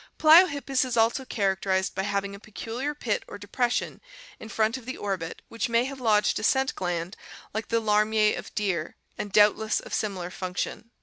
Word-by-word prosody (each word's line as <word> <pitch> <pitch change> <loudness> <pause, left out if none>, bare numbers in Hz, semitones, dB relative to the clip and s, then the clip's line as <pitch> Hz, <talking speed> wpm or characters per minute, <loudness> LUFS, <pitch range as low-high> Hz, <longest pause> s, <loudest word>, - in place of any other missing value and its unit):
Pliohip 315 -2 +6
pus 270 -1 +1
is 250 -2 -3
also 230 +4 +2
characterized 190 -4 0
by - - -2
having 200 0 -2
a 200 - -9
pe 215 - -18
culiar 260 +8 -4
pit 215 -4 -1
or - - -8
depression 240 +5 -2 0.4
in 220 - -9
front 220 +1 +1
of 255 -2 -9
the 260 - -5
orbit 190 -5 -4
which 230 +1 -3
may 235 +1 +3
have 270 0 -7
lodged 215 -3 +2
a - - -6
scent 265 +3 +2
gland 175 0 -3 0.4
like 220 +1 -3
the 230 - +1
larmier 215 0 +2
of - - -8
deer 185 -6 -1 0.2
and 205 - -5
doubt 210 +1 +5
less 220 0 0
of - - -10
similar 185 -4 -2
function. 185 +5 -4
215 Hz, 195 wpm, -26 LUFS, 200-240 Hz, 0.4 s, Pliohip